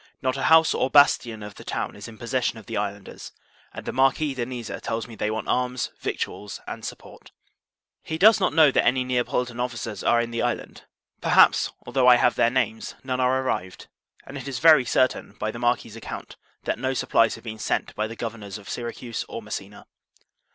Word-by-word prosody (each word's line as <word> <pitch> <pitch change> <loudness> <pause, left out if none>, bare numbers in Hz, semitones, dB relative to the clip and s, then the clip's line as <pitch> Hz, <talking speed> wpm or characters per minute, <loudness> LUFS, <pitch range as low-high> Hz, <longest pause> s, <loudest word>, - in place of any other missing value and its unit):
Not 130 0 -1
a 135 - -4
house 160 0 +6
or 130 - 0
bastion 120 -7 +4
of 105 0 -8
the - - -12
town - - -4
is 105 +2 -9
in 115 -1 -11
possession 120 0 -1
of 110 - -12
the - - -6
islanders; 100 -1 -5 0.4
and - - -9
the - - -2
Marquis 135 +3 +2
de 120 -3 -3
Niza 120 -3 -6
tells 115 +1 -3
me, 115 - -11
they 105 0 -1
want 110 0 -3
arms, 125 0 -1
victuals, 105 -1 -4
and - - -7
support. - - -9 0.7
He 160 - -4
does 215 +5 +6
not 185 - +2
know, 155 -2 +6
that - - +2
any 130 +1 +2
Neapolitan 125 -1 -1
officers 115 -4 -4
are 120 - +4
in 120 0 -2
the 115 - -2
island; 120 -1 -3 0.4
perhaps, - - +5
although 130 -2 +2
I 125 - +9
have 120 0 +3
their 115 - +3
names, 120 -3 -1
none 130 -1 -2
are 130 +1 +2
arrived; 95 -8 -4 0.4
and 140 +1 -7
it 130 - -8
is 135 -3 -3
very 155 -5 +6
certain, 130 -4 +1
by 110 +1 -3
the 120 - -8
Marquis's 120 -2 0
account, 115 - -8 0.3
that - - -2
no 130 0 -1
supplies 115 - +2
have 115 - -14
been 110 -2 -7
sent - - -1
by 110 +1 -2
the 115 - -8
governors 110 -4 -6
of 100 - -14
Syracuse 120 0 -5
or 115 - -6
Messina. 105 -1 -7
120 Hz, 205 wpm, -25 LUFS, 110-130 Hz, 0.7 s, I